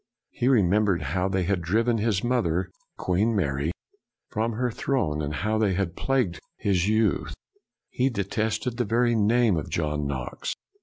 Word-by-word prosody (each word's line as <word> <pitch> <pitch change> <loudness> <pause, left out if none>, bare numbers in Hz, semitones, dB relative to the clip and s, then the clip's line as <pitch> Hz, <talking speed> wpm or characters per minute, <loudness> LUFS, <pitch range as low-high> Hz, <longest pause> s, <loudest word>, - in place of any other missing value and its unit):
He 120 - -1
remembered 105 -5 +3
how 95 0 +1
they 95 -1 0
had 90 0 0
driven 115 +7 +1
his 105 -3 0
mother, 95 -7 0 0.3
Queen 105 +6 +1
Mary, 75 -4 0 0.6
from 115 +2 -1
her 125 +2 -1
throne, 105 - -1
and 75 0 -2
how 110 +8 -1
they 100 -4 +2
had 90 -3 -1
plagued 125 - 0 0.2
his 95 -2 +1
youth. 110 -6 +1 0.6
He 130 +2 +1
detested 110 +2 -2
the 120 - +1
very 120 +3 +2
name 110 -2 +3
of 75 - -4
John 75 -3 -1
Knox. 65 -2 -4
100 Hz, 155 wpm, -26 LUFS, 85-115 Hz, 0.6 s, remembered